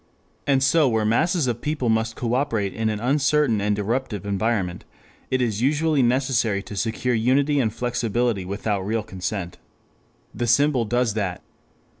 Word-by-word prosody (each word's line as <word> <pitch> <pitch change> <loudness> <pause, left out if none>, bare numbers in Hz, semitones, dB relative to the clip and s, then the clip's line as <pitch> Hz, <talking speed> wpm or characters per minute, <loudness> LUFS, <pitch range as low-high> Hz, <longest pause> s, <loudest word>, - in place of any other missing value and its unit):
And 135 -2 +3
so 145 +1 +4
where 110 -2 +1
masses 155 - +2
of 120 -2 -2
people 150 -4 -2
must 110 0 +1
coöperate 115 -5 -1
in 110 -1 -1
an 105 -1 -2
uncertain 135 -2 +2
and 105 0 0
eruptive 105 -1 -2
environment, 100 -3 -1 0.5
it 130 -1 +1
is 110 -3 -1
usually 150 +2 +2
necessary 120 -5 +1
to 105 - -9
secure 115 +5 -1
unity 135 +6 +2
and 115 -5 +1
flexibility 120 -2 -1
without 100 +1 -2
real 110 +3 -1
consent. 95 -1 -5 0.7
The 120 +2 -2
symbol 130 0 +3
does 120 0 +1
that. 95 -4 -3
115 Hz, 150 wpm, -23 LUFS, 105-130 Hz, 0.7 s, so